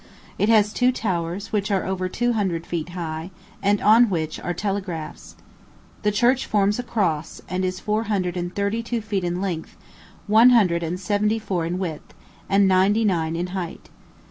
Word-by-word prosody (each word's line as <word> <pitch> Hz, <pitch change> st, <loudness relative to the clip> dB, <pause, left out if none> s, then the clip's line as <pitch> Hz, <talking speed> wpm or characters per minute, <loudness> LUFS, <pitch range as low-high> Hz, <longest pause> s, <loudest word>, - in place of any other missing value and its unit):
It 205 Hz, -, +2 dB
has 210 Hz, -2 st, +4 dB
two 250 Hz, 0 st, +3 dB
towers, 180 Hz, -5 st, -3 dB
which 205 Hz, -2 st, 0 dB
are 195 Hz, -2 st, 0 dB
over 185 Hz, -1 st, -2 dB
two 240 Hz, +5 st, 0 dB
hundred 185 Hz, -6 st, -1 dB
feet 170 Hz, -1 st, -4 dB
high, 165 Hz, -1 st, -5 dB, 0.3 s
and 200 Hz, +1 st, +2 dB
on 225 Hz, +2 st, +6 dB
which 160 Hz, -4 st, -2 dB
are 175 Hz, -, -3 dB
telegraphs. 185 Hz, -4 st, -4 dB, 0.7 s
The 210 Hz, -, +2 dB
church 245 Hz, +5 st, +2 dB
forms 205 Hz, +1 st, +2 dB
a -, -, +1 dB
cross, 170 Hz, -10 st, -2 dB
and 185 Hz, +2 st, -2 dB
is 185 Hz, 0 st, -2 dB
four 215 Hz, +2 st, -1 dB
hundred 185 Hz, -4 st, -1 dB
and 175 Hz, 0 st, -3 dB
thirty 200 Hz, +3 st, 0 dB
two 230 Hz, 0 st, -3 dB
feet 205 Hz, -3 st, -2 dB
in 175 Hz, +1 st, -2 dB
length, 175 Hz, -5 st, -4 dB, 0.5 s
one 225 Hz, +4 st, +6 dB
hundred 190 Hz, -9 st, +4 dB
and 170 Hz, +2 st, -3 dB
seventy 210 Hz, +3 st, +1 dB
four 185 Hz, -6 st, -2 dB
in 175 Hz, +2 st, -2 dB
width, 170 Hz, -5 st, -5 dB, 0.3 s
and 195 Hz, 0 st, +4 dB
ninety 195 Hz, +4 st, +3 dB
nine 165 Hz, -5 st, 0 dB
in 175 Hz, +2 st, -2 dB
height. 180 Hz, -3 st, -5 dB
195 Hz, 180 wpm, -23 LUFS, 175-210 Hz, 0.7 s, on